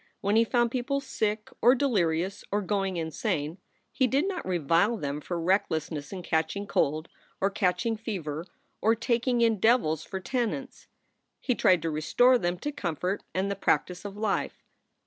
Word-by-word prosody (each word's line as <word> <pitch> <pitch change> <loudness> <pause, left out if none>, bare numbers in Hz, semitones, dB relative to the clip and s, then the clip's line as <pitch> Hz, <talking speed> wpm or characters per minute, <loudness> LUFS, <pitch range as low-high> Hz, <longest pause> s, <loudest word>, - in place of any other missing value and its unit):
When 200 +2 +1
he 225 - +6
found 240 0 +1
people 260 +3 -1
sick 215 -6 -2
or 245 +3 +6
delirious 190 - 0
or 205 +1 0
going 195 -2 -1
insane, 160 0 -2 0.3
he 260 - +2
did 275 +8 +1
not 375 -3 -3
revile 175 +5 +2
them 145 -4 -3
for 175 +3 -3
recklessness 160 -4 0
in 185 -2 -6
catching 160 +5 -1
cold 155 -3 0 0.3
or 195 +1 +1
catching 215 +3 0
fever 175 -7 -4 0.3
or 225 +2 +4
taking 235 +1 +1
in 225 -3 +3
devils 185 - +3
for 190 - -5
tenants. 255 +4 -3 0.5
He 250 - 0
tried 180 -7 +3
to 165 - -1
restore 245 +12 +4
them 175 -2 -1
to 295 - -2
comfort 185 - -2
and 190 +2 0
the - - -1
practice 180 -1 0
of 205 0 -7
life. 210 -2 -2
200 Hz, 165 wpm, -28 LUFS, 170-235 Hz, 0.5 s, he